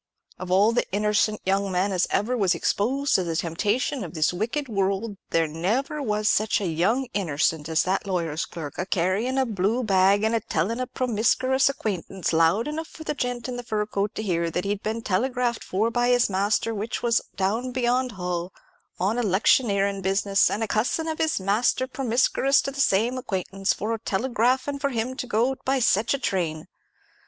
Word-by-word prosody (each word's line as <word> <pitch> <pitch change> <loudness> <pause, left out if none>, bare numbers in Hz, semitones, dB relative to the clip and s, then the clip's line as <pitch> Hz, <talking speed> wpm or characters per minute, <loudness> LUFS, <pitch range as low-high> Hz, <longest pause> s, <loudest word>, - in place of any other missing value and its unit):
Of 185 - -6
all 200 +4 +4
the 235 - -1
innercent 210 +1 +1
young 195 +1 +1
men 185 +2 +1
as 185 -1 +1
ever 240 +5 0
was 190 -6 +2
exposed 265 +11 0
to 185 - +3
the 165 -2 -3
temptations 205 - -1
of 175 -1 -8
this 155 +2 +1
wicked 235 +10 -2
world, 200 0 -1
there 165 0 +2
never 220 - -1
was 210 -4 -1
sech 215 0 +2
a 200 - -3
young 185 +11 +1
innercent 160 -4 0
as 160 0 +2
that 190 +2 -1
lawyer's 165 -4 -1
clerk, 155 -4 -8
a 180 - -2
carryin' 195 +9 0
a 265 - +3
blue 220 +2 0
bag, 195 0 +3
and 220 +1 +1
a 230 - +2
tellin' 210 +6 -2
a 255 - -2
promiskruous 255 +2 +1
acquaintance, 195 -8 -3
loud 165 - +3
enough 315 +2 -4
for 315 - -11
the 300 - -2
gent 245 -3 -3
in 250 -1 -4
the 245 - -5
fur 215 -3 -1
coat 205 0 -2
to 215 - -3
hear, 170 -4 0
that 180 +3 -3
he'd 205 0 -2
been 225 +1 -3
telegraphed 245 +4 0
for 215 +5 0
by 240 +1 +1
his 245 -4 +3
master, 205 +4 +1
which 215 +2 -4
was 235 -1 +3
down 220 +7 -1
beyond 250 0 0
Hull, 180 -1 -3 0.5
on 200 +6 0
electioneerin' 200 -1 +2
business; 195 +1 +2
and 220 - -2
a - - -1
cussin' 250 +10 0
of 320 -1 -3
his 320 -7 +1
master 210 +6 +1
promiskruous 260 +1 +2
to 275 - -3
the 275 0 -2
same 235 +4 +2
acquaintance 195 -3 -2
for 225 +2 -2
telegraphin' 255 +6 0
for 280 0 0
him 245 0 -2
to 255 - -5
go 240 +4 +1
by 270 +1 +1
sech 225 -3 +2
a - - -2
train. 170 - -2
210 Hz, 190 wpm, -25 LUFS, 190-245 Hz, 0.5 s, all